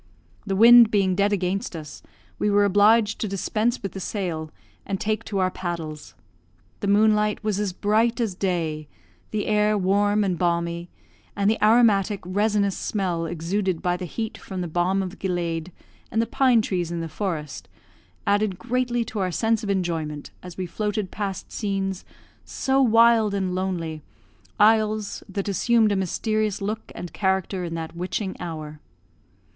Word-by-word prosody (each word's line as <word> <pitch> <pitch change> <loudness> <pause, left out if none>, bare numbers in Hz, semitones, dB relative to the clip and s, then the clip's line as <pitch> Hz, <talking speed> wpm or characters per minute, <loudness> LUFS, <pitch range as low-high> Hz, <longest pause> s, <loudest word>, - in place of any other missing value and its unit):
The 195 - 0
wind 235 +2 +8
being 195 -3 +2
dead 200 +3 +2
against 190 -1 -1
us, 155 -3 -8 0.4
we 210 - +1
were 205 0 +4
obliged 210 +2 +4
to 215 - 0
dispense 215 +5 -1
with 195 - -3
the 195 - -7
sail, 175 -6 -3 0.3
and 195 -1 -3
take 215 0 -1
to 205 - -3
our 185 -1 +1
paddles. 165 -5 -6 0.6
The - - -3
moonlight 210 +1 +3
was 210 -2 0
as 205 -2 -1
bright 220 +5 +1
as 225 -5 0
day, 165 -5 -2 0.4
the 210 -1 -2
air 210 0 +2
warm 205 +2 +2
and 185 -4 -1
balmy; 170 0 -1 0.5
and 200 -1 +1
the 220 - -2
aromatic, 215 -3 +4
resinous 205 +1 +1
smell 180 -5 -2
exuded 175 +2 -2
by 180 0 +1
the 180 0 -5
heat 220 +4 -5
from 190 -2 -6
the 175 - -3
balm 180 +4 +1
of 185 +1 -7
gilead 175 -2 -2 0.4
and 225 - -1
the 230 - +3
pine 240 -1 +3
trees 175 -4 -2
in 170 -1 -3
the 165 - -4
forest, 155 -4 -4 0.6
added 205 -2 +1
greatly 240 +2 -1
to 215 - -5
our 185 -1 0
sense 225 +4 +1
of 205 - -4
enjoyment 165 -6 -2
as 180 -1 -10
we 185 - -2
floated 205 +2 -3
past 200 -2 -5
scenes 195 -3 -2 0.4
so 270 0 0
wild 230 -3 +5
and 190 -2 -1
lonely 175 -4 -3 0.6
isles 215 -1 +3
that 195 +1 -3
assumed 220 +2 +3
a - - +1
mysterious 210 +2 -1
look 215 +2 -4
and 175 - -7
character 190 -1 0
in 165 -1 -4
that 165 0 -6
witching 185 +3 -3
hour. 155 -3 -6
195 Hz, 160 wpm, -24 LUFS, 175-215 Hz, 0.6 s, wind